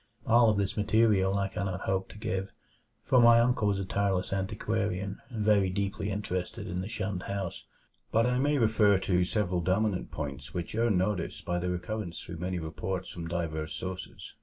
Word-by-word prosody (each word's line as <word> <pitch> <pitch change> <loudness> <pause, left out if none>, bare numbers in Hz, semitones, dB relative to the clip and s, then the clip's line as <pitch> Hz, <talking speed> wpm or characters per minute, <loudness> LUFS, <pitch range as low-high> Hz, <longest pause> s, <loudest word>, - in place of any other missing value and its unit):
All 115 0 +6
of 105 - +2
this 100 +1 0
material 105 -2 +3
I 100 0 +1
cannot 95 -1 -3
hope 95 0 -1
to - - -11
give, 95 -2 -3 0.5
for 130 -2 +4
my 115 0 +8
uncle 120 -3 +2
was 100 -1 +2
a 100 - -2
tireless 95 -1 0
antiquarian 100 0 -2
and 110 -4 -3
very 100 -3 +4
deeply 100 +1 -2
interested 95 -3 -3
in 90 +1 -3
the 95 - -5
shunned 100 -5 -3
house; 100 -3 -4 0.5
but 115 +1 +3
I 125 0 +1
may 145 +2 +2
refer 110 -4 +4
to 90 -1 +1
several 90 -2 0
dominant 95 +2 0
points 70 +2 -6
which 85 -2 -3
earn 115 -3 +2
notice 95 -2 -1
by 90 0 -1
their 90 +1 -2
recurrence 90 0 -4
through 85 - -8
many 90 +2 -2
reports 80 +3 -4
from 85 -1 -6
diverse 80 -2 -3
sources. 95 0 -6
95 Hz, 185 wpm, -29 LUFS, 90-105 Hz, 0.5 s, my